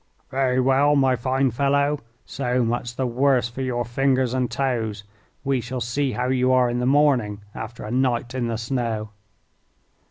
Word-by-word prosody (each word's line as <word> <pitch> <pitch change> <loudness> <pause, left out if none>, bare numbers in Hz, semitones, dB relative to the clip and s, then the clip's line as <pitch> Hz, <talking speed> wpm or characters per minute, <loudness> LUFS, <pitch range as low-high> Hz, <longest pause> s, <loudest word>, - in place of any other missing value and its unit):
"Very 130 -1 +1
well, 135 +3 +3
my 135 -2 +3
fine 130 +2 0
fellow, 140 +3 +1 0.3
so 125 -2 -1
much 120 +1 -2
the 130 - -1
worse 125 0 +2
for 125 +3 -7
your 120 -2 -1
fingers 130 +1 +1
and 130 -2 0
toes. 115 -5 -2 0.4
We 135 -2 0
shall 125 +3 -5
see 125 +3 -1
how 125 +1 -1
you 130 0 +2
are 125 -1 +3
in 120 - -1
the 125 - 0
morning 130 -8 +2
after 115 +1 -7
a 105 - -6
night 125 -1 0
in 125 -2 -1
the 115 -1 -2
snow." 115 -3 -2
125 Hz, 170 wpm, -23 LUFS, 120-135 Hz, 0.4 s, well